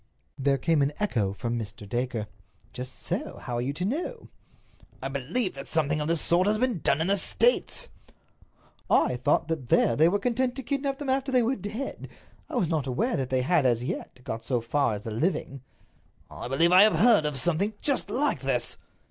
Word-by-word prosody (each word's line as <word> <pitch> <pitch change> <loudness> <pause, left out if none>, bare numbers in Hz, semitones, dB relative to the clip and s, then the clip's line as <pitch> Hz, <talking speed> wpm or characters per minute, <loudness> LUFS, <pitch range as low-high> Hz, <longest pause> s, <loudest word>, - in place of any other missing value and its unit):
There 135 0 +2
came 155 +3 +2
an 140 +2 +1
echo 115 - 0
from 115 +4 -3
Mr. 105 -1 -8
Dacre. 120 -1 -2 0.5
"Just 125 +1 -6
so—how 120 - -4
are - - -1
you 130 +3 -1
to 175 +5 -3
know?" 335 - -4 0.7
"I 135 - -4
believe 160 - 0
that 135 0 -8
something 150 -1 0
of 150 - -2
this 165 -1 +1
sort 180 +3 +2
has 215 +1 +2
been 245 -5 0
done 145 0 +1
in - - +1
the 200 +2 +3
States." - - +1 1.0
"I 125 - +3
thought 145 +3 +1
that 155 -7 -4
there 115 - +4
they 160 +5 +5
were 200 - +1
content 245 +4 0
to 270 - -5
kidnap 275 +1 -2
them 285 -2 -5
after 270 0 0
they 250 -2 +4
were 250 +4 +1
dead. 220 +5 -6 0.4
I - - -6
was 175 - +1
not 155 -4 -1
aware 225 - 0
that 130 -2 -2
they 130 -1 +1
had, 170 +1 +3
as 120 -2 +2
yet, - - -5
got 110 - -3
quite - - -26
so 125 -3 +1
far 115 0 0
as 105 - -8
the 115 - -5
living." 140 - -2 0.7
"I - - -7
believe 165 +7 +3
that 180 - +7
I - - +10
have 215 +1 +6
heard 220 -10 +5
of 145 -2 -3
something 175 - 0
just 280 -3 0
like 285 - 0
this." 130 -3 -2
155 Hz, 210 wpm, -27 LUFS, 130-215 Hz, 1.0 s, I